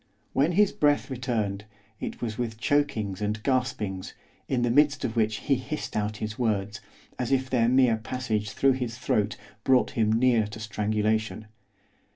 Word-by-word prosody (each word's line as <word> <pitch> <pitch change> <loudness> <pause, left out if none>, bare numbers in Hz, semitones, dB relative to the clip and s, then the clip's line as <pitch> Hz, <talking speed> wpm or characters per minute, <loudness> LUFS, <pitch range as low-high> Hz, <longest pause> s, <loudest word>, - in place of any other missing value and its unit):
When 150 +6 +2
his 205 +2 +4
breath 145 -1 +1
returned, 110 -6 -2 0.3
it - - -5
was 110 -2 -2
with 115 -2 -3
chokings 110 -7 0
and 105 +1 0
gaspings, 125 -8 -1 0.3
in 125 -2 0
the 120 - +2
midst 145 +2 +3
of 115 - -3
which 110 -1 +2
he 140 - +1
hissed 135 +4 -4
out 105 0 -1
his 110 +1 -5
words, 105 -3 -1 0.4
as 125 0 -2
if 130 0 +1
their 120 -2 +3
mere 125 -3 +4
passage 110 -2 -2
through 135 +7 +3
his 125 -2 -4
throat 105 -4 0 0.3
brought 130 -1 +3
him 110 -2 +1
near 115 -1 +3
to 105 +1 -9
strangulation. 110 0 -1
115 Hz, 165 wpm, -27 LUFS, 105-130 Hz, 0.4 s, his